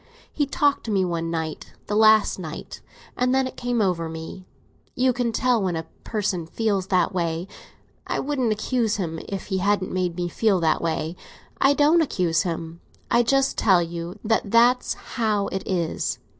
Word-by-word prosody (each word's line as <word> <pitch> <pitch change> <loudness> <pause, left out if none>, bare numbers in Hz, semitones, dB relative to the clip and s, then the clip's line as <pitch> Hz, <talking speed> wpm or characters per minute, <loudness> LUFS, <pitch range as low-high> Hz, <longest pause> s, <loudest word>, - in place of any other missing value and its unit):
He 290 -2 0
talked 290 -1 +1
to 225 - -3
me 195 -2 +2
one 165 -1 -2
night—the 160 +5 -5
last 215 -2 +5
night; 160 -3 -7 0.3
and 250 +1 +1
then 265 0 +2
it 260 - -6
came 245 -2 0
over 170 -4 0
me. 160 +3 -8 0.5
You 255 0 +2
can 240 -1 -1
tell 245 0 +2
when 185 -3 -1
a 160 0 -4 0.2
person 200 -6 -2
feels 200 -1 -1
that 185 -3 +2
way. 170 0 -2 0.6
I - - -1
wouldn't 265 -5 0
accuse 220 +1 0
him 165 -5 -3
if 195 -1 -4
he 190 - +1
hadn't 200 0 +1
made 180 -2 -1
me 175 0 -2
feel 200 +1 +1
that 160 -1 +2
way. 165 0 -2 0.4
I 275 - +5
don't 305 +4 +4
accuse 180 - +1
him; 165 -2 -5 0.3
I 240 - +5
just 270 +3 +1
tell 185 -5 +4
you 170 +1 -6
that 220 -1 0
that's 240 +3 +4
how 215 -4 -1
it 190 - -3
is. 175 -4 -1
195 Hz, 175 wpm, -24 LUFS, 170-235 Hz, 0.6 s, last